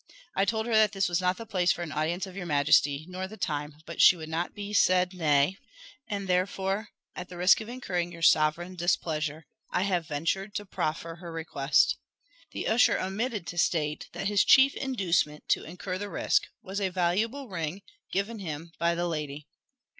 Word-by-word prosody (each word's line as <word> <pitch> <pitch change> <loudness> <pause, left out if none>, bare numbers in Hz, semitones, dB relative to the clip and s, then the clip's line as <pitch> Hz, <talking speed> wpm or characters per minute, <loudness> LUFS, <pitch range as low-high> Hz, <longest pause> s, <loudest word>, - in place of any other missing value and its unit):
I 195 - +3
told 220 +2 0
her 235 - -2
that 215 -2 +5
this 195 -1 +1
was 175 0 0
not 180 0 +1
the 230 - -7
place 185 -5 +2
for 175 - -2
an 160 - -6
audience 160 +6 -1
of 190 -2 -11
your 185 -3 -5
majesty, 145 0 +3
nor 185 +1 -5
the 215 +3 -11
time; 150 -4 -3
but 170 - -2
she - - +8
would 160 -2 -8
not 165 +2 -2
be 205 0 -6
said 185 -2 +3
nay, 155 +1 +2 0.5
and 200 -2 -3
therefore, 190 +3 0 0.3
at 180 - -7
the 180 - -9
risk 180 +5 +5
of 220 - -8
incurring 180 -9 -3
your 170 -1 -9
sovereign 165 +3 +3
displeasure, 160 -3 -1 0.3
I 180 - +1
have 180 -5 0
ventured 175 +7 -2
to 205 - -3
proffer 165 -2 -3
her 170 -1 -9
request." 155 -3 +1 0.5
The - - -4
usher 230 +3 +4
omitted 210 +1 -2
to 175 0 -4
state 150 -2 0
that - - -5
his 205 0 +3
chief 270 +1 +6
inducement 180 - 0
to - - +2
incur 180 +3 -5
the 205 0 -4
risk - - +1 0.2
was 195 +2 -4
a 190 - +1
valuable 205 +10 0
ring, 175 -1 -4 0.3
given 205 +3 -2
him 165 -2 -6
by 170 0 +2
the 175 +1 -1
lady. 150 -3 -4
180 Hz, 190 wpm, -28 LUFS, 160-200 Hz, 0.5 s, she